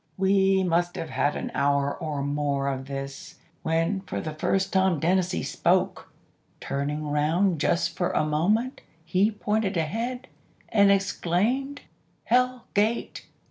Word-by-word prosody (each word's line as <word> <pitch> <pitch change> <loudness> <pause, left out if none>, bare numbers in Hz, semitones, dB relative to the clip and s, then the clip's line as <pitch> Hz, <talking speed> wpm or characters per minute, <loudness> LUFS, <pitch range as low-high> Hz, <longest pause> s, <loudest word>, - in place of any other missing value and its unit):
"We 190 0 +3
must 175 0 +1
have 165 -6 -5
had 135 +3 +1
an - - -4
hour 140 0 +1
or 150 -3 -4
more 145 -1 -1
of 135 0 -4
this, 135 0 -6 0.3
when 165 +4 0
for - - -3
the 155 - -5
first 190 +5 0
time 190 -4 +3
Dennazee 175 - +1
spoke. - - 0 0.5
Turning 145 +2 -3
round 160 +4 +2
just 170 - +1
for 175 - 0
a 155 - +1
moment 205 - 0 0.2
he 185 +5 +2
pointed 210 -2 -1
ahead, 230 +10 -2 0.4
and 200 -2 +5
exclaimed, 205 +8 0 0.4
'Hell 250 0 +1
Gate! 215 +3 0
175 Hz, 135 wpm, -26 LUFS, 150-200 Hz, 0.5 s, and